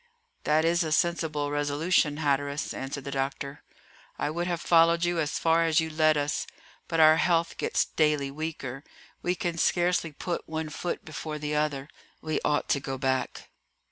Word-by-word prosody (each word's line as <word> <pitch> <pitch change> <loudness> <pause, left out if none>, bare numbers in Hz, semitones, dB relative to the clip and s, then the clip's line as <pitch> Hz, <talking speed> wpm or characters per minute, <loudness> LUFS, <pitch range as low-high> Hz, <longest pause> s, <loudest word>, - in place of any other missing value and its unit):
"That 155 +1 +3
is 170 +1 +3
a 160 - -3
sensible 155 -3 0
resolution, 145 +1 +1
Hatteras," 145 -1 -1
answered 135 +1 -5
the 140 - -5
doctor; 140 +1 -3 0.6
"I 145 - -1
would 170 +2 -2
have 175 -2 -1
followed 170 0 +4
you 175 -1 0
as 150 -2 -1
far 165 0 +3
as 160 -2 +3
you 160 0 -2
led 155 -1 +3
us, 145 +1 -1 0.4
but 165 - -1
our 155 0 +7
health 170 -1 +2
gets - - +1
daily 150 -3 +1
weaker; 140 -3 -5 0.4
we 180 +1 0
can 170 -1 -3
scarcely 175 -2 +1
put 170 +4 -4
one 160 0 -3
foot 175 +3 -4
before 155 0 -5
the 150 0 -3
other; 150 -2 -1 0.3
we 155 0 -2
ought 150 0 +1
to 140 - +2
go 135 0 -4
back." 130 0 -2
155 Hz, 170 wpm, -27 LUFS, 145-165 Hz, 0.6 s, our